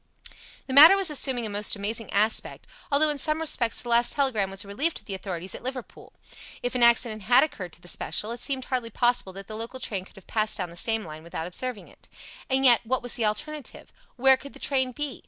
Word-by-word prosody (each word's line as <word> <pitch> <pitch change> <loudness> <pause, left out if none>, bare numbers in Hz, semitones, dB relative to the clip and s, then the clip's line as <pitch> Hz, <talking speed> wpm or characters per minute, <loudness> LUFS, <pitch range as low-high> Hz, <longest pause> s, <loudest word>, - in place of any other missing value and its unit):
The 260 - -6
matter 310 +7 +10
was 390 -5 0
assuming 260 -5 -1
a - - -2
most 205 +1 +2
amazing 215 +2 -4
aspect, 215 +2 +1 0.3
although 300 +2 +4
in 290 - -5
some 305 +3 +2
respects 260 -7 0
the 240 - -8
last 235 +1 +3
telegram 245 -9 0
was 195 +2 -2
a - - -15
relief 285 +12 -1
to - - -7
the 200 - -5
authorities 185 -1 -5
at - - -8
Liverpool. 255 -1 -8 0.5
If 245 - -2
an 250 - -1
accident 235 -2 +4
had 245 +7 +5
occurred 190 - -5
to - - -12
the 175 - -14
special, 210 +4 -1
it 240 - -5
seemed 265 0 -2
hardly 250 -3 -3
possible 240 -3 +1
that 195 +1 -10
the 215 - -8
local 230 +4 -7
train 195 -7 -4
could - - -20
have 195 - -16
passed 215 -1 0
down 180 -4 -5
the - - -13
same 225 +4 0
line 155 -1 -10
without 165 0 -6
observing 215 +5 -3
it. - - -19 0.4
And 265 0 +1
yet, 240 -3 +6
what 250 +2 -2
was 245 - 0
the 230 - 0
alternative? 295 +8 -5 0.2
Where 265 +1 +5
could 280 +1 -12
the - - -12
train 260 -2 0
be? 290 +1 -5
235 Hz, 235 wpm, -25 LUFS, 205-265 Hz, 0.5 s, matter